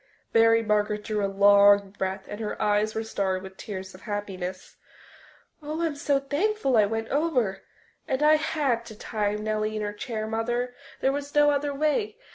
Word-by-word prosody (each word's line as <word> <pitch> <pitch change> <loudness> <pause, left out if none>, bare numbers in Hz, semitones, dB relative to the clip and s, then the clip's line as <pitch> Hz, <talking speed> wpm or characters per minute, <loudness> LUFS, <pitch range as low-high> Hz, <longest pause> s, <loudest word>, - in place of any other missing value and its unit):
Mary 230 0 +5
Margaret 210 -1 0
drew 210 -2 -2
a 200 - +1
long 200 0 +5
breath 190 -1 -3
and 205 - -7
her 215 -2 -4
eyes 210 +1 +1
were 220 - -1
starry 195 -4 -1
with 190 0 -10
tears 190 -2 -7
of 185 - -14
happiness. 190 -3 -5 0.9
"Oh, 305 +3 -3
I'm 320 -3 -1
so 285 -1 +1
thankful 290 - 0
I 210 -2 +5
went 225 +1 -3
over. 270 -10 0 0.5
And 265 +2 0
I 305 +1 +6
had 290 -7 0
to 220 - -9
tie 210 -1 -2
Nellie 215 0 -2
in 215 - -2
her 205 0 -3
chair, 215 0 -4
Mother, 240 +3 -2 0.3
there 270 - +3
was 285 +1 -5
no 295 0 +5
other 285 0 0
way. 310 - 0
220 Hz, 180 wpm, -26 LUFS, 205-280 Hz, 0.9 s, I